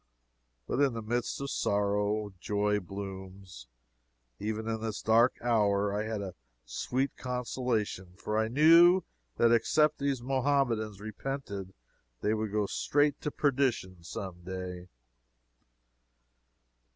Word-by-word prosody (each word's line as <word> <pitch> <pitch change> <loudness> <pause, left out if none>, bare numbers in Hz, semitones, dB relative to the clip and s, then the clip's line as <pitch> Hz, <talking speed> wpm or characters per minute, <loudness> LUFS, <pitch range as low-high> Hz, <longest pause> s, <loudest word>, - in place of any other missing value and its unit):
But 125 - -2
in 140 -3 +3
the 115 -1 -5
midst 120 +2 -2
of 140 - -3
sorrow, 105 0 0
joy 105 +1 +1
blooms. 95 -6 -8 0.7
Even 110 +2 -3
in 110 -1 -2
this 110 -2 -3
dark 115 +3 +4
hour 105 -4 +2
I 105 +1 -1
had 110 -2 -3
a 95 -2 -6 0.3
sweet 130 - -2
consolation. 120 -7 -2
For 105 +2 -4
I 110 0 +2
knew 165 +8 +6 0.3
that 115 0 +4
except 150 +6 +3
these 140 -2 0
Mohammedans 125 -6 +1
repented 105 -3 -5 0.5
they 105 - +1
would 110 -1 -2
go 105 0 +1
straight 145 +7 +1
to - - -1
perdition 125 - 0
some 90 +1 -6
day. 90 -1 -6
110 Hz, 120 wpm, -30 LUFS, 100-125 Hz, 0.7 s, knew